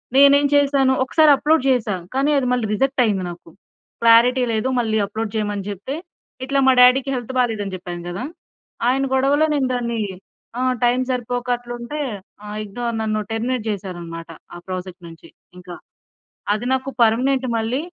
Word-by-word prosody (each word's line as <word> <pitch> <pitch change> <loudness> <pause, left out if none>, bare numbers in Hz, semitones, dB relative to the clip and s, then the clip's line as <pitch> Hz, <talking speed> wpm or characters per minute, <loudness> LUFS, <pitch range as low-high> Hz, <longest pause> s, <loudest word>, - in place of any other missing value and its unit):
నేనేమి 280 +1 +6
చేశాను. 275 -2 +3
ఒక్కసారి 305 +3 +4
అప్లోడ్ 305 0 +2
చేశాను. 210 -8 -1
కానీ 275 +3 +2
అది 255 - 0
మళ్ళి 245 -3 0
రిజెక్ట్ 270 +3 +1
అయింది 195 -4 0
నాకు. 175 -1 -11 0.5
క్లారిటీ 235 +3 +5
లేదు 220 +3 -1
మళ్ళీ 220 -2 0
అప్లోడ్ 215 +2 -4
చేయమని 205 -2 -2
చెప్తే, 205 +8 -5 0.5
ఇట్లా 275 +1 0
మా - - +7
డాడీ‌కి 250 +2 +6
హెల్త్ 245 0 -5
బాలేదని 215 -6 -1
చెప్పాను 175 -1 -7
కదా! 185 +7 -5 0.6
ఆయన 265 +2 +2
గొడవలో 275 +3 +3
నేను 275 -3 +1
దాన్ని 235 -1 -2 0.6
ఆ! - - -1 0.2
టైమ్‌ 245 +1 +3
సరిపోక 245 0 -3
అట్లుంటే 240 +4 -7 0.4
ఆ! - - -10 0.2
ఇగ్నోర్ 235 +3 -4
నన్ను 215 -1 -1
టెర్మినేట్ 235 +1 -2
చేసారన్నమాట 175 -5 -6 0.3
ఆ - - -7
ప్రాజెక్ట్ 185 0 -6
నుంచి 165 -1 -13 0.3
ఇంక. 180 0 -14 0.8
అది 215 +3 -3
నాకు 265 +1 -1
పర్మనెంట్ 255 +4 +2
మళ్ళీ 230 +5 -1
240 Hz, 150 wpm, -20 LUFS, 210-265 Hz, 0.8 s, మా